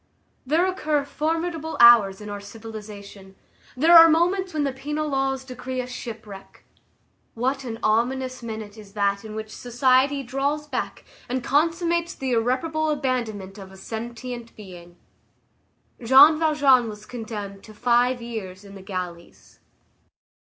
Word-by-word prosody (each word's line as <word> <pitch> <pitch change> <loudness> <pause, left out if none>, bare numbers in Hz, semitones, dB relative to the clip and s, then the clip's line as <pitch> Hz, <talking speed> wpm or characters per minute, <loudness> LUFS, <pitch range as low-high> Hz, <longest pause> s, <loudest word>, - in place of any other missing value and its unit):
There 320 +6 +3
occur 305 -6 -1
formidable 320 +1 -3
hours 220 -5 +7
in 210 - -8
our 205 - -5
civilization; 205 -2 -11 0.4
there 325 +6 +5
are 330 0 +10
moments 360 +4 +1
when 305 -2 -1
the 275 -2 -1
penal 295 +3 -3
laws 270 -1 -1
decree 255 0 -6
a 250 - -2
shipwreck. 220 -5 -10 0.7
What 260 +4 -1
an 225 -2 -5
ominous 255 +4 0
minute 220 -2 -7
is 200 -2 -14
that 200 0 0
in 215 -1 -8
which 220 0 -7
society 260 +3 +2
draws 275 +4 -2
back 295 - -5 0.2
and 255 0 -2
consummates 335 +4 0
the 265 -1 -3
irreparable 260 +7 0
abandonment 235 -9 -3
of 190 -1 -11
a 190 - -14
sentient 235 +3 -7
being! 175 -4 -13 1.1
Jean 280 +6 +7
Valjean 285 -7 +3
was 210 0 -10
condemned 210 -5 -7
to 215 - -13
five 245 +2 +2
years 205 -5 -7
in 200 - -12
the 195 - -11
galleys. 180 -3 -8
245 Hz, 135 wpm, -24 LUFS, 215-285 Hz, 1.1 s, are